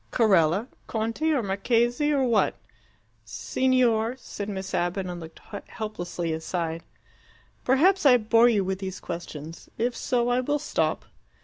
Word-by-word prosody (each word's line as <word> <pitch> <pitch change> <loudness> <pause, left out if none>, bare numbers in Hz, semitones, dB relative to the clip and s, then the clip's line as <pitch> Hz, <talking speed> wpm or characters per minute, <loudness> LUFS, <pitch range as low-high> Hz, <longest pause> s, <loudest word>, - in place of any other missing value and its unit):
"Carella? 195 -1 +3 0.2
Conte 230 +8 -1
or 285 -6 +1
Marchese, 235 +8 +1
or 280 -2 +2
what?" 230 -4 +2 0.7
"Signor," 250 -3 +1
said 205 -5 -7
Miss 190 -1 -5
Abbott, 175 +2 -1
and 175 -1 -5
looked 160 -1 -11 0.3
helplessly 175 -7 -4
aside. 165 0 -3 0.8
"Perhaps 350 +10 +3
I 260 -4 +7
bore 230 +1 +4
you 210 -4 +2
with 190 0 -2
these 190 -1 -5
questions. 165 -1 -8
If 240 +2 0
so, 240 -1 0
I 245 +1 +2
will 290 +4 0
stop." 295 - -1
220 Hz, 135 wpm, -26 LUFS, 180-245 Hz, 0.8 s, I